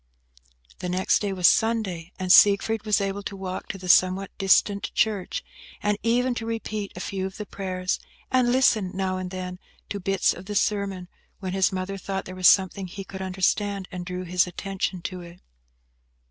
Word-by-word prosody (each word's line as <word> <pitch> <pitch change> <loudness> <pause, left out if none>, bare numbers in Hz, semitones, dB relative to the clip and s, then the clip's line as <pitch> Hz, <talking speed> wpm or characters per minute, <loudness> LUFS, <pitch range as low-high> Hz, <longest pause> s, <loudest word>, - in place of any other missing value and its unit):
The 180 - -4
next 185 +1 +2
day 205 -2 -2
was 180 -2 +4
Sunday, 195 -7 +1
and 185 -1 +3
Siegfried 210 +2 +5
was 210 0 +3
able 200 0 -2
to 200 0 -6
walk 185 -1 -5
to - - -5
the 185 -1 -9
somewhat 185 +2 +3
distant 200 +1 +3
church, 215 - 0 0.4
and 210 0 +2
even 245 +2 +2
to 230 -1 -4
repeat 215 -3 -3
a - - -7
few 190 0 -3
of 190 - -10
the 210 - -5
prayers, 185 -2 -3 0.3
and 255 -2 +3
listen, 230 -7 +3
now 190 -1 -1
and 185 -1 -4
then, 180 -1 -6 0.3
to 200 - -3
bits 195 +1 +2
of 185 +2 -11
the 205 - -4
sermon, 200 -3 0 0.3
when 185 -2 -4
his 190 0 +2
mother 190 +1 -4
thought 195 +1 -4
there 185 - -8
was 185 -1 +4
something 190 0 +4
he 195 +2 -7
could 190 0 -8
understand, 190 +1 0
and 180 -1 -5
drew 180 0 -4
his 180 0 +1
attention 190 -1 -3
to 185 -2 -5
it. 170 0 -12
195 Hz, 190 wpm, -25 LUFS, 185-205 Hz, 0.4 s, Siegfried